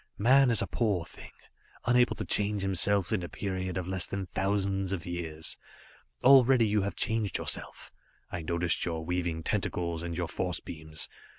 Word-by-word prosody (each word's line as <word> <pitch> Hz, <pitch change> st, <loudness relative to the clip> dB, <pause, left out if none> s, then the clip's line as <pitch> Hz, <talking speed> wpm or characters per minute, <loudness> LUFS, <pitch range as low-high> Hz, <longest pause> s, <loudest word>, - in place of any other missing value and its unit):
"Man 130 Hz, +5 st, +5 dB
is 115 Hz, -, +4 dB
a -, -, -1 dB
poor 100 Hz, -8 st, -1 dB
thing, -, -, -13 dB, 0.6 s
unable 125 Hz, +1 st, +3 dB
to -, -, -5 dB
change 105 Hz, -1 st, +2 dB
himself 95 Hz, +2 st, +3 dB
in 100 Hz, -, 0 dB
a 85 Hz, -, -6 dB
period 95 Hz, -2 st, -4 dB
of 90 Hz, -1 st, -4 dB
less 95 Hz, -1 st, +2 dB
than 100 Hz, -1 st, -4 dB
thousands 95 Hz, 0 st, -1 dB
of 90 Hz, -2 st, -4 dB
years. 80 Hz, -3 st, -3 dB, 0.7 s
Already 130 Hz, -2 st, +6 dB
you 105 Hz, 0 st, +1 dB
have 100 Hz, +1 st, -3 dB
changed 110 Hz, -3 st, 0 dB
yourself. -, -, -1 dB, 0.4 s
I 85 Hz, -, -4 dB
noticed 85 Hz, +2 st, 0 dB
your 80 Hz, -2 st, -3 dB
weaving 85 Hz, -2 st, -2 dB
tentacles, 85 Hz, -1 st, -2 dB
and 85 Hz, -1 st, -5 dB
your 85 Hz, -2 st, -2 dB
force 90 Hz, 0 st, -2 dB
beams. 80 Hz, -1 st, -5 dB
95 Hz, 170 wpm, -29 LUFS, 85-105 Hz, 0.7 s, Already